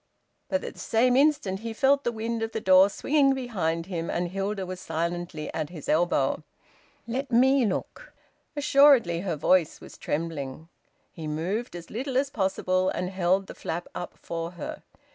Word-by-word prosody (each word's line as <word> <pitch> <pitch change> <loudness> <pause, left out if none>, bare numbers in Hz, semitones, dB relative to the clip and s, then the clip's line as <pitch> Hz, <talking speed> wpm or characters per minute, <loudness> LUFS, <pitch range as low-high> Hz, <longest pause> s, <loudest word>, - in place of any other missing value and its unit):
But 280 - 0
at - - -6
the - - -15
same 245 +3 +2
instant 270 -9 +2
he 225 +1 -5
felt 275 +4 +3
the 240 - +1
wind 230 0 -3
of 225 0 -3
the - - -1
door 190 -1 +6
swinging 275 +5 +2
behind 180 -11 -2
him, 170 -3 -4
and 175 0 -1
Hilda 195 +1 -2
was 185 0 -6
silently 170 -1 -3
at 155 -2 -3
his 165 -5 -9
elbow. 175 +3 +2 0.7
"Let 265 +4 -3
me 260 +1 +4
look," 190 - -3
she - - -16
said. - - -32
Assuredly 275 -12 +5
her 175 -2 -2
voice 165 +2 +2
was - - -13
trembling. 155 -1 -4 0.4
He 160 -2 -7
moved, 180 +10 -3
as 170 -1 -9
little 255 +3 -2
as 275 +1 +1
possible, 185 -3 0
and 180 +1 -3
held 190 +1 +1
the - - -9
flap 170 +2 -5
up 175 - -6
for 165 +1 -5
her. 170 - -7
190 Hz, 180 wpm, -27 LUFS, 170-240 Hz, 0.7 s, door